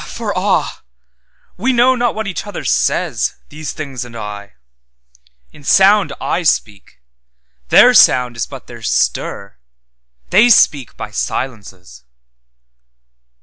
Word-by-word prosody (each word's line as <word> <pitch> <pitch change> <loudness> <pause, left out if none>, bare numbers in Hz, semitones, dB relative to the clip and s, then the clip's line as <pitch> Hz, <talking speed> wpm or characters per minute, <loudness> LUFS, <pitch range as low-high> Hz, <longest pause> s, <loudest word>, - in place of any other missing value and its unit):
For - - -5
ah! - - -1 0.8
we 245 +8 0
know 245 +2 +4
not 240 -1 -1
what 220 0 -4
each 195 +1 -5
other 205 - -7
says, - - 0
These 155 +1 -7
things 135 -5 -6
and 120 -1 -12
I; 105 -1 -8 1.0
in 150 - -17
sound 195 +5 +4
I 175 - -2
speak—Their - - 0
sound 125 -2 +4
is 115 - -3
but - - -11
their - - -12
stir, 100 -7 -2 0.7
they 215 +6 +5
speak 145 - +3
by 105 - -7
silences. 100 - -6
125 Hz, 115 wpm, -16 LUFS, -, 1.0 s, they